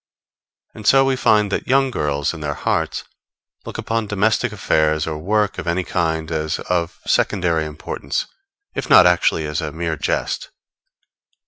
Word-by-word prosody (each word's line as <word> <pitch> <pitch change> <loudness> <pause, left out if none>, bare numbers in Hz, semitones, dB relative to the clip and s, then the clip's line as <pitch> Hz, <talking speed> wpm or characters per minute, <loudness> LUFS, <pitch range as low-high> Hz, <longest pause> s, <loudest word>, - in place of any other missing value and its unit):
And 110 -2 -7
so 135 0 +6
we 135 0 +2
find 105 -5 +3
that - - -2
young 135 0 +3
girls, 75 - -1
in 80 - -8
their 75 -1 -3
hearts, - - -1 0.6
look - - -6
upon 115 -1 -2
domestic 105 +2 +1
affairs 80 -1 +1
or 75 -1 -4
work 105 +4 0
of - - -6
any 90 +2 0
kind 80 -2 -1
as 80 0 -1
of 85 -1 -2
secondary 85 -4 +1
importance, 75 -2 -4 0.5
if - - -4
not - - +8
actually 90 -2 +3
as 75 +2 -2
a 80 -2 -4
mere 80 0 -3
jest. - - -2
85 Hz, 155 wpm, -20 LUFS, 80-105 Hz, 0.6 s, not